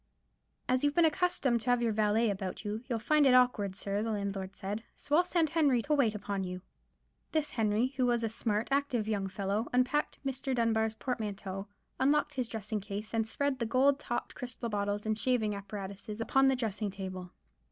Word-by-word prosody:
"As 255 Hz, +1 st, +2 dB
you've 290 Hz, 0 st, +2 dB
been 340 Hz, -, +6 dB
accustomed 310 Hz, -8 st, +2 dB
to 245 Hz, -, -3 dB
have 245 Hz, -1 st, +3 dB
your 230 Hz, -, +2 dB
valet 215 Hz, +1 st, +2 dB
about 190 Hz, -1 st, -5 dB
you, 210 Hz, +2 st, -3 dB
you'll 235 Hz, -, +1 dB
find 290 Hz, +5 st, +3 dB
it 255 Hz, -, +6 dB
awkward, 220 Hz, -6 st, +3 dB
sir," 200 Hz, +1 st, -2 dB
the 225 Hz, -, -2 dB
landlord 200 Hz, -3 st, -2 dB
had 195 Hz, -, -27 dB
said; 205 Hz, +3 st, -4 dB
"so 290 Hz, -, -1 dB
I'll 345 Hz, -, +6 dB
send 340 Hz, -3 st, +1 dB
Henry 285 Hz, -8 st, +3 dB
to 300 Hz, -, 0 dB
wait 245 Hz, -7 st, +3 dB
upon 200 Hz, -1 st, -3 dB
you." 180 Hz, 0 st, -5 dB, 0.7 s
This 310 Hz, -2 st, +1 dB
Henry, 225 Hz, +1 st, +1 dB
who 255 Hz, -2 st, +3 dB
was 240 Hz, -1 st, +1 dB
a 225 Hz, -, +1 dB
smart, 220 Hz, -1 st, -1 dB
active 270 Hz, -6 st, +1 dB
young 200 Hz, -3 st, 0 dB
fellow, 200 Hz, +3 st, -2 dB
unpacked 255 Hz, +4 st, +1 dB
Mr. 265 Hz, 0 st, -2 dB
Dunbar's 220 Hz, -2 st, +1 dB
portmanteau, 205 Hz, -5 st, -4 dB, 0.3 s
unlocked 295 Hz, +2 st, +2 dB
his 255 Hz, -4 st, -1 dB
dressing 215 Hz, -1 st, -3 dB
case, 205 Hz, +2 st, -6 dB
and 225 Hz, -1 st, +1 dB
spread 280 Hz, +2 st, -1 dB
the 235 Hz, -, 0 dB
gold 270 Hz, +4 st, +3 dB
topped 240 Hz, -, -3 dB
crystal 245 Hz, -1 st, -5 dB
bottles 205 Hz, 0 st, -1 dB
and 215 Hz, 0 st, +1 dB
shaving 230 Hz, -5 st, +1 dB
apparatus 200 Hz, +1 st, -6 dB
upon 270 Hz, +4 st, +3 dB
the 265 Hz, -, +4 dB
dressing 220 Hz, -4 st, -2 dB
table. 185 Hz, -2 st, -6 dB
225 Hz, 195 wpm, -31 LUFS, 205-260 Hz, 0.7 s, been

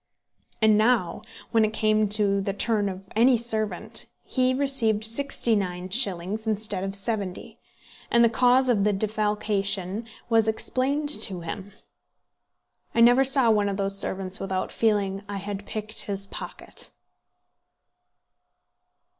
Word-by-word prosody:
And 215 Hz, -1 st, +5 dB
now, 220 Hz, -5 st, +1 dB, 0.3 s
when 225 Hz, -1 st, +3 dB
it 215 Hz, 0 st, 0 dB
came 215 Hz, -1 st, +1 dB
to 200 Hz, -1 st, +4 dB
the 195 Hz, 0 st, -3 dB
turn 205 Hz, 0 st, 0 dB
of 190 Hz, 0 st, -9 dB
any 240 Hz, +3 st, +4 dB
servant, 220 Hz, -2 st, -1 dB, 0.2 s
he 255 Hz, -1 st, 0 dB
received 255 Hz, -6 st, +1 dB
sixty 230 Hz, 0 st, +2 dB
nine 180 Hz, -2 st, -3 dB
shillings 205 Hz, -1 st, 0 dB
instead 210 Hz, -3 st, -2 dB
of 195 Hz, 0 st, -4 dB
seventy, 200 Hz, -2 st, -4 dB, 0.5 s
and 235 Hz, 0 st, +4 dB
the -, -, +6 dB
cause 250 Hz, +3 st, +3 dB
of 220 Hz, -5 st, +2 dB
the 210 Hz, 0 st, +2 dB
defalcation 210 Hz, -1 st, -1 dB, 0.2 s
was 225 Hz, -2 st, +2 dB
explained 270 Hz, +6 st, -1 dB
to 190 Hz, -11 st, +1 dB
him. 190 Hz, +4 st, -7 dB, 1.2 s
I 230 Hz, -, +3 dB
never 245 Hz, +3 st, +6 dB
saw 265 Hz, -3 st, +4 dB
one 205 Hz, -2 st, +1 dB
of 195 Hz, -, -3 dB
those 195 Hz, 0 st, -2 dB
servants 190 Hz, -1 st, -1 dB
without 190 Hz, -1 st, -3 dB
feeling 205 Hz, -3 st, 0 dB
that 195 Hz, -, -13 dB
I 200 Hz, -, -4 dB
had 200 Hz, 0 st, -6 dB
picked 215 Hz, 0 st, -6 dB
his 200 Hz, -1 st, -4 dB
pocket. -, -, -9 dB
215 Hz, 140 wpm, -25 LUFS, 195-230 Hz, 1.2 s, the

